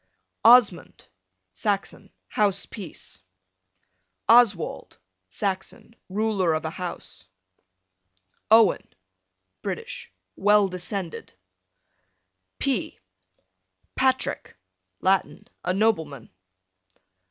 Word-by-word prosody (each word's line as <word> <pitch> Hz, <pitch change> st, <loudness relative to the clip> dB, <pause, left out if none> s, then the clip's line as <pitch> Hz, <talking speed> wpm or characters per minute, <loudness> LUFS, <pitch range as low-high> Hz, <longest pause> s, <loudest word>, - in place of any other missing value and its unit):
Osmund, 230 Hz, -5 st, +5 dB, 0.5 s
Saxon, 200 Hz, -, -3 dB, 0.2 s
house 205 Hz, -3 st, +1 dB
peace. 155 Hz, -, -8 dB, 1.1 s
Oswald, 225 Hz, -7 st, +3 dB, 0.3 s
Saxon, 195 Hz, -, -4 dB
ruler 195 Hz, -4 st, +1 dB
of 155 Hz, -, -3 dB
a 160 Hz, -, -2 dB
house. 175 Hz, -, -6 dB, 1.2 s
Owen, 220 Hz, -1 st, +4 dB, 0.7 s
British, -, -, -6 dB, 0.2 s
well 205 Hz, 0 st, +4 dB
descended. 180 Hz, -, -5 dB, 1.2 s
P 265 Hz, -8 st, -1 dB, 1.0 s
Patrick, 260 Hz, -, 0 dB, 0.4 s
Latin, 190 Hz, 0 st, 0 dB, 0.2 s
a -, -, 0 dB
nobleman. 165 Hz, -, -1 dB
195 Hz, 65 wpm, -25 LUFS, 175-220 Hz, 1.2 s, Osmund